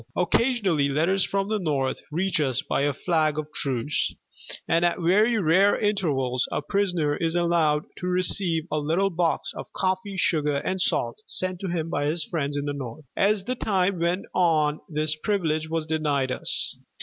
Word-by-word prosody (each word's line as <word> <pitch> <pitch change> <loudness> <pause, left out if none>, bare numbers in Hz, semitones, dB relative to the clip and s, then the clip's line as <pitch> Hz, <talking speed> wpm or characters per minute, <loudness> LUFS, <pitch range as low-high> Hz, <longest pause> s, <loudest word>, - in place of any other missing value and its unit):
Occasionally 185 - +2
letters 170 +7 +2
from 195 0 -1
the 215 0 0
North 140 -7 -1
reach 180 +3 0
us 135 -1 0
by - - -1
a 145 +1 +2
flag 155 +1 0
of 155 0 -5
truce, 135 +1 -1 0.5
and 165 +1 +2
at 175 0 +2
very 210 +7 +3
rare 190 +2 +4
intervals 145 - 0
a - - -2
prisoner 175 -5 0
is 165 +1 -1
allowed 170 -3 +2 0.2
to 180 - -3
receive 180 -2 +2
a 155 - +1
little 170 +7 +1
box 170 -1 0
of - - -8
coffee, 190 +1 -1
sugar, 150 -5 +1
and 185 +6 -2
salt, 120 - 0
sent 185 -1 -2
to 195 - -4
him 165 -2 -2
by 145 -2 0
his 155 +1 -1
friends 145 -3 -2
in 145 - -2
the 145 - -2
North." 140 +2 -7
As 200 0 +2
the 250 - -1
time 195 -6 0
went 170 +3 0
on 155 -4 +2
this 155 0 -1
privilege 160 -4 -1
was 165 -1 -1
denied 150 -4 0
us. - - -2
165 Hz, 175 wpm, -25 LUFS, 150-185 Hz, 0.5 s, rare